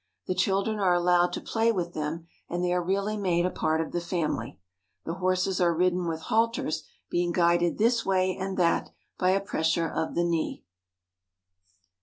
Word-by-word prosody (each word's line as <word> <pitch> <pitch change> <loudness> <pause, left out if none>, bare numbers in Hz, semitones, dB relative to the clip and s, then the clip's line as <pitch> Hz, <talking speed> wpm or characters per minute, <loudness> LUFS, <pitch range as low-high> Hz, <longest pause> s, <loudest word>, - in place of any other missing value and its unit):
The - - -1
children 195 +3 0
are 185 -3 +3
allowed 175 0 +3
to - - -2
play 225 0 +1
with 175 -5 -3
them, 155 +2 -4 0.2
and 175 +1 -2
they 180 0 +1
are 180 - +1
really 200 +4 -1
made 175 -4 +1
a 180 - 0
part 160 0 0
of 160 - -5
the 175 - -2
family. 170 -9 -2 0.5
The 165 - -3
horses 185 +1 0
are 170 -1 +3
ridden 180 0 +1
with 160 -1 -3
halters, 225 -4 0 0.2
being 175 0 +1
guided 175 0 +2
this 230 +2 +2
way 185 -1 +1
and 190 0 -4
that 170 -2 +2 0.3
by 185 - +3
a 190 +1 +3
pressure 165 -3 0
of 160 - -3
the 170 - +2
knee. 170 -2 -1
180 Hz, 180 wpm, -27 LUFS, 170-190 Hz, 0.5 s, are